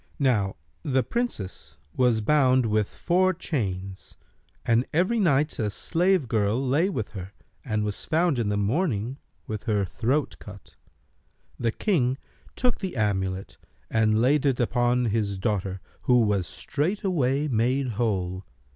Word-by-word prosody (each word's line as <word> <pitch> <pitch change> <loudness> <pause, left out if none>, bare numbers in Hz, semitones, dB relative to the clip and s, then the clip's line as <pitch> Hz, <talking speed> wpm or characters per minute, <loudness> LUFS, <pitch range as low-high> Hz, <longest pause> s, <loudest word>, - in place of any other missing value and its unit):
Now 115 -9 +1 0.3
the 130 -2 +1
Princess 95 - -4 0.2
was 125 -3 +3
bound 130 0 +4
with 105 -2 +1
four 185 +1 +1
chains, 95 - -4 0.5
and 115 +1 +3
every 185 +9 +2
night 150 -5 +2
a 105 -2 0
slave 175 - +1
girl 110 0 +1
lay 140 +8 +2
with 115 - -3
her 95 -1 -8 0.3
and 110 -5 -1
was 105 -1 -3
found 160 -4 +1
in 110 -3 0
the 100 - 0
morning 120 - 0 0.3
with 110 0 -5
her 105 -4 +1
throat 125 - -1
cut. - - -12 0.8
The 115 -1 +1
King 135 - +1 0.4
took 250 -2 +1
the 190 -6 -4
amulet 95 -3 -1 0.3
and 110 -1 +3
laid 135 +4 +3
it 135 -3 +1
upon 120 0 +2
his 105 -3 0
daughter 95 -2 -2 0.2
who 125 -1 +4
was 100 -5 +1
straightway 150 -4 0
made 130 +2 +1
whole. 95 -5 -1
120 Hz, 140 wpm, -26 LUFS, 105-145 Hz, 0.8 s, bound